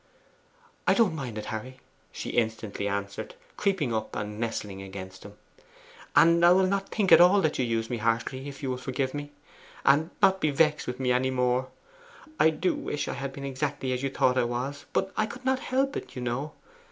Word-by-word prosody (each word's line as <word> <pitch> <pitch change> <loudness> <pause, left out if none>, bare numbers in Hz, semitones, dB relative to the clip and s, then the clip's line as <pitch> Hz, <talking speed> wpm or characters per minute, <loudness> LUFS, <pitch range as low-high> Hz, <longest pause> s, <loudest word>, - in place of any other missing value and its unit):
'I - - +5
don't 220 -8 +3
mind 125 -7 -5
it, 105 - -5
Harry!' 125 +4 -6 0.3
she - - -5
instantly 110 -3 -1
answered, 100 - -4 0.2
creeping 185 - 0
up 110 -1 -3
and 105 0 -4
nestling 105 -4 -3
against 95 -1 -9
him; 100 0 -11 0.8
'and 170 +1 +6
I 175 - +8
will 190 +1 +4
not 195 +1 -1
think 205 -4 0
at - - +10
all 180 +3 +7
that 155 -5 0
you 130 - +2
used 115 0 -1
me 120 - -1
harshly 115 +5 -1
if 140 +1 -11
you 130 - -1
will 125 - -2
forgive 130 +1 -2
me, 145 0 -5 0.5
and 150 +4 +4
not 190 0 +4
be 155 - +3
vexed 150 +1 +2
with 125 +1 -4
me 130 -1 +1
any 125 +1 +2
more? 125 0 +1 0.7
I 160 - +6
do 160 +4 0
wish 150 - -3
I - - -2
had 140 0 -4
been 140 0 -7
exactly 135 -1 -2
as 125 - -2
you 135 - -1
thought 130 -1 +2
I - - +3
was, 125 +4 -3
but 195 0 -1
I 215 - +1
could 255 +3 -10
not 260 0 +2
help 270 +2 0
it, - - -6
you 125 - -4
know. 135 +5 -3
130 Hz, 210 wpm, -27 LUFS, 115-160 Hz, 0.8 s, at